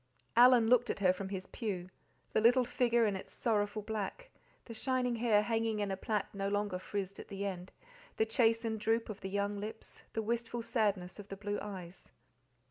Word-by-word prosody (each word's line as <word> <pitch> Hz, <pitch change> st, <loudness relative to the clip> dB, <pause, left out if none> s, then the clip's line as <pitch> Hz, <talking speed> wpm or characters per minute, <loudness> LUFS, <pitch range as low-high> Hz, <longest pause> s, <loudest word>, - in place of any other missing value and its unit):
Alan 245 Hz, -1 st, +7 dB
looked 245 Hz, 0 st, +4 dB
at -, -, -1 dB
her 185 Hz, -2 st, +4 dB
from 190 Hz, +1 st, -5 dB
his 190 Hz, -1 st, -4 dB
pew 185 Hz, -5 st, -4 dB, 0.4 s
the -, -, +3 dB
little 245 Hz, +3 st, +5 dB
figure 240 Hz, -1 st, +2 dB
in 205 Hz, -2 st, +1 dB
its 190 Hz, -, -7 dB
sorrowful 210 Hz, -2 st, 0 dB
black, 220 Hz, -, -4 dB, 0.3 s
the 230 Hz, -, -8 dB
shining 250 Hz, +1 st, 0 dB
hair 220 Hz, -3 st, +3 dB
hanging 225 Hz, -1 st, 0 dB
in 205 Hz, -1 st, -1 dB
a -, -, 0 dB
plait 205 Hz, +1 st, -1 dB
no 195 Hz, 0 st, -2 dB
longer 205 Hz, -2 st, -1 dB
frizzed 195 Hz, 0 st, -4 dB
at -, -, -8 dB
the 200 Hz, 0 st, -4 dB
end, 185 Hz, -2 st, -5 dB, 0.5 s
the 220 Hz, -, +3 dB
chastened 225 Hz, 0 st, +2 dB
droop 225 Hz, +2 st, +1 dB
of 210 Hz, -, -6 dB
the 190 Hz, -, -4 dB
young 200 Hz, +1 st, -1 dB
lips, 215 Hz, +2 st, -7 dB
the 220 Hz, -, -1 dB
wistful 235 Hz, +1 st, -2 dB
sadness 205 Hz, -6 st, 0 dB
of 205 Hz, -, -9 dB
the 195 Hz, -, -7 dB
blue 205 Hz, +1 st, -3 dB
eyes. 190 Hz, -3 st, -8 dB
210 Hz, 195 wpm, -33 LUFS, 200-230 Hz, 0.5 s, Alan